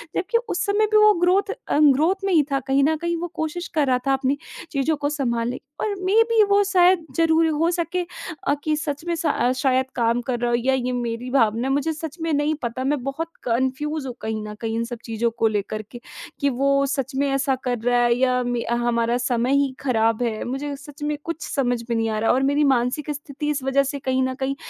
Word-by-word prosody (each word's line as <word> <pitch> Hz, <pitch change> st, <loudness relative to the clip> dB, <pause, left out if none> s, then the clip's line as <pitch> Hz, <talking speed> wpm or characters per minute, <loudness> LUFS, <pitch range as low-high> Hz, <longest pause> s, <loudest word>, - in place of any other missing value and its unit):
जबकि 430 Hz, +6 st, +1 dB
उस 360 Hz, -, -1 dB
समय 425 Hz, +1 st, +2 dB
भी 430 Hz, -, +5 dB
वो 425 Hz, -, +7 dB
ग्रोथ 390 Hz, +3 st, +3 dB, 0.2 s
अ, -, -, +1 dB
ग्रोथ 310 Hz, +7 st, +3 dB
में 390 Hz, -, +1 dB
ही 310 Hz, -3 st, +5 dB
था, 275 Hz, -, +2 dB
कहीं 270 Hz, +1 st, +1 dB
न 315 Hz, +3 st, +3 dB
कहीं 340 Hz, +1 st, -2 dB
वो 350 Hz, -, -2 dB
कोशिश 315 Hz, +3 st, -3 dB
कर 285 Hz, -, +2 dB
रहा 250 Hz, -1 st, +2 dB
था 270 Hz, -, +4 dB
अपनी 270 Hz, +1 st, 0 dB, 0.3 s
चीज़ों 295 Hz, +2 st, +1 dB
को 290 Hz, 0 st, -1 dB
सँभाले 245 Hz, -4 st, -1 dB, 0.2 s
और 420 Hz, -2 st, -1 dB
मेबी 450 Hz, +3 st, +4 dB
वो 405 Hz, 0 st, +5 dB
शायद 360 Hz, -2 st, +4 dB
ज़रूरी 325 Hz, 0 st, +4 dB, 0.2 s
हो 335 Hz, -, +3 dB
सके 345 Hz, +1 st, -1 dB, 0.4 s
अ, -, -, +4 dB
कि 310 Hz, -1 st, +1 dB
सच 300 Hz, -1 st, -4 dB
में 345 Hz, -, -1 dB
स 295 Hz, -6 st, +1 dB
शायद 260 Hz, -1 st, +2 dB
काम 235 Hz, 0 st, +1 dB
कर 245 Hz, -2 st, -1 dB
रहा 240 Hz, 0 st, 0 dB
हो 240 Hz, -, +2 dB
या 260 Hz, +3 st, +1 dB
ये 255 Hz, -1 st, -1 dB
मेरी 240 Hz, 0 st, -3 dB
भावना 230 Hz, -1 st, +2 dB
है, 270 Hz, -, +1 dB
मुझे 285 Hz, +3 st, 0 dB
सच 315 Hz, +1 st, -7 dB
में 330 Hz, 0 st, -1 dB
नहीं 295 Hz, +1 st, +1 dB
पता, 240 Hz, +2 st, -3 dB
मैं 280 Hz, 0 st, 0 dB
बहुत 280 Hz, +5 st, -3 dB
कन्फ्यूज 265 Hz, +5 st, -1 dB
हूँ 255 Hz, -, -4 dB
कहीं 220 Hz, 0 st, -3 dB
न 210 Hz, -, -6 dB
कहीं 225 Hz, 0 st, -2 dB
इन 230 Hz, -, 0 dB
सब 240 Hz, 0 st, -6 dB
चीज़ों 230 Hz, 0 st, 0 dB
को 225 Hz, -, +3 dB
लेकर 215 Hz, 0 st, -2 dB
के 240 Hz, -, -8 dB, 0.4 s
कि 280 Hz, -1 st, +2 dB
वो 275 Hz, +2 st, +2 dB
सच 270 Hz, -1 st, -2 dB
में 280 Hz, +1 st, +1 dB
ऐसा 275 Hz, 0 st, +1 dB
कर 245 Hz, -1 st, -1 dB
रहा 245 Hz, +2 st, +2 dB
है 240 Hz, 0 st, +4 dB
या 255 Hz, -1 st, +2 dB
मे 245 Hz, -1 st, -1 dB
हमारा 235 Hz, 0 st, +1 dB
समय 250 Hz, 0 st, 0 dB
ही 280 Hz, -1 st, +1 dB
खराब 225 Hz, -3 st, +1 dB
है, 225 Hz, -2 st, -2 dB
मुझे 280 Hz, +3 st, -4 dB
सच 290 Hz, +1 st, -11 dB
में 295 Hz, 0 st, -1 dB
कुछ 335 Hz, -2 st, -5 dB
समझ 245 Hz, -3 st, 0 dB
में 235 Hz, -, 0 dB
नहीं 225 Hz, 0 st, 0 dB
आ 215 Hz, -1 st, -1 dB
रहा 225 Hz, -, +2 dB
और 265 Hz, +1 st, +2 dB
मेरी 285 Hz, +2 st, +2 dB
मानसिक 255 Hz, +5 st, -1 dB
स्थिति 290 Hz, +1 st, -5 dB
इस 285 Hz, -3 st, -1 dB
वज़ह 270 Hz, +1 st, +2 dB
से 280 Hz, -, -4 dB
कहीं 260 Hz, -1 st, 0 dB
न 260 Hz, 0 st, -1 dB
कहीं 270 Hz, +1 st, -1 dB
275 Hz, 235 wpm, -23 LUFS, 245-310 Hz, 0.4 s, वो